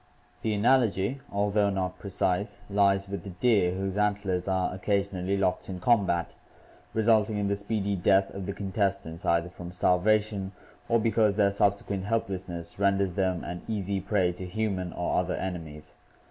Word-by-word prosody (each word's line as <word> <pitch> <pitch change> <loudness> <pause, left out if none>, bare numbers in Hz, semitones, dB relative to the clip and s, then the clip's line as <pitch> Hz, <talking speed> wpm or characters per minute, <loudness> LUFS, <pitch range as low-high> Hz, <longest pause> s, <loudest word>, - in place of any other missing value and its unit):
The 110 -2 0
analogy, 115 0 +2
although 100 0 +2
not 90 -2 -2
precise, 95 +1 -1
lies 100 -1 +3
with 100 0 -5
the 100 - -7
deer 95 -2 +2
whose 95 +1 -2
antlers 100 -3 0
are 95 -1 0
occasionally 100 0 -1
locked 95 -1 0
in 90 -1 -5
combat, 90 -5 +2 0.6
resulting 110 -1 +3
in 100 -1 0
the 100 - +1
speedy 100 0 -2
death 95 +1 +3
of 95 -2 -6
the 100 - -2
contestants, 95 -4 -2
either 85 +1 +2
from 90 -1 -8
starvation 100 +2 +1 0.4
or 115 - +4
be 115 0 +1
cause 110 -3 +3
their 100 -2 +3
subsequent 100 -1 0
helplessness 95 -6 -3
renders 100 -2 +2
them 95 -2 0
an 90 0 -5
easy 100 -3 -1
prey 95 -2 +1
to 90 +1 -7
human 95 -2 -2
or 90 - 0
other 90 0 -1
enemies. 80 -5 -6
100 Hz, 160 wpm, -28 LUFS, 90-105 Hz, 0.6 s, or